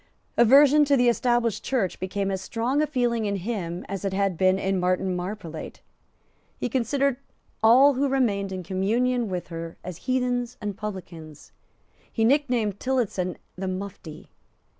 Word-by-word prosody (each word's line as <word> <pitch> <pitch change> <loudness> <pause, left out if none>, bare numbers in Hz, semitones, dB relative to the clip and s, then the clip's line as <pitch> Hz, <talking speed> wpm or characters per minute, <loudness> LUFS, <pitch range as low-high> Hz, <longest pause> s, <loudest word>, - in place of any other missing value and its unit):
Aversion 280 +5 +6
to 280 -1 +3
the 245 -1 +4
Established 240 -3 +1
Church 230 -9 -1
became 195 +1 -2
as 190 -1 -3
strong 245 +8 -1
a 305 - +1
feeling 240 -5 0
in 200 -1 -1
him 185 -3 -4
as 195 0 -5
it 195 -1 -2
had 195 -1 0
been 185 +2 +3
in 190 0 0
Martin 185 +1 0
Marprelate. 180 -3 -6 0.8
He 250 - -2
considered 265 +2 0 0.4
all 255 +6 +7
who 275 +2 0
remained 205 -8 0
in 185 -1 -5
communion 225 +6 0
with 180 -2 -4
her 165 -1 -7
as 180 -2 -7
heathens 245 -1 0
and 205 -2 -4
publicans. 170 -7 -8 0.6
He 225 - +1
nicknamed 245 -7 +1
Tillotson 215 -9 -1 0.2
the 190 +1 -4
Mufti. 185 -4 -7
210 Hz, 150 wpm, -25 LUFS, 185-250 Hz, 0.8 s, all